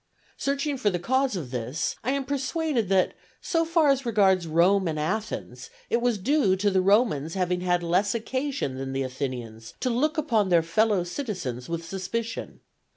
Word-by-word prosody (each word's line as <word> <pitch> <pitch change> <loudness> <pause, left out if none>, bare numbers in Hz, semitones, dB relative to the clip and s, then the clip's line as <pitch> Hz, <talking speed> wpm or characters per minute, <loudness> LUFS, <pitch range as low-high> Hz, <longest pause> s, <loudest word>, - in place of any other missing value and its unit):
Searching 280 +1 -1
for 215 -5 +2
the 180 - -1
cause 260 +6 +1
of 150 -9 -5
this, 125 +5 -2
I 240 - -1
am 280 -1 -1
persuaded 280 - -1
that, 190 -1 +3 0.3
so 330 -1 0
far 330 -2 +3
as 275 -1 +2
regards 195 -7 +3
Rome 180 +4 +3
and 155 -2 -2
Athens, 215 - -3 0.2
it 235 - +2
was 240 -2 +1
due 210 -2 +2
to 200 +2 +1
the 190 -1 +3
Romans 185 - +2
having 180 -1 0
had 175 -1 +1
less 185 +5 +1
occasion 260 - -2
than 135 0 -4
the 135 0 -1
Athenians 125 -4 -5
to 255 - 0
look 300 +7 +1
upon 230 -10 +1
their 170 -2 +4
fellow 205 +3 +2
citizens 175 - -5
with 170 0 -3
suspicion. 195 +6 -4
195 Hz, 175 wpm, -26 LUFS, 170-255 Hz, 0.3 s, their